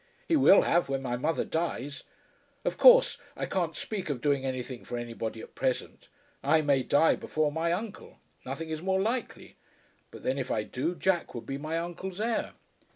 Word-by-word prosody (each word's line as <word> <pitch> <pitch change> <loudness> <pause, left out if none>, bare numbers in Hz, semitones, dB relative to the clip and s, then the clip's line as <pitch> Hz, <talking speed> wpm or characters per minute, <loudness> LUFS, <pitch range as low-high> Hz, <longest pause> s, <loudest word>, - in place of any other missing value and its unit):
"He 335 - +3
will 265 -9 +7
have, 170 -4 +2
when 135 0 -1
my 120 -2 -1
mother 155 +6 0
dies. 145 -4 -3 0.6
Of - - 0
course - - +7 0.2
I - - -2
can't - - -1
speak 195 -6 -4
of 140 -4 -2
doing 140 0 +1
anything 130 -1 -4
for 120 - -5
anybody 115 -1 -5
at - - -12
present. 130 -2 -2 0.3
I 155 +3 +3
may 140 -3 +3
die 145 +5 +4
before 155 -1 -1
my 165 +2 0
uncle. 205 +4 -5 0.3
Nothing 150 +5 -5
is 155 0 -3
more 190 +1 +1
likely. 230 +4 -3 0.5
But - - -12
then, 135 +2 0
if 130 - -3
I 105 - 0
do, 150 +11 -2
Jack 175 -5 0
would 120 - -6
be 135 0 -4
my 155 +2 -2
uncle's 175 +3 -5
heir." 225 +1 -1
155 Hz, 185 wpm, -29 LUFS, 130-180 Hz, 0.6 s, will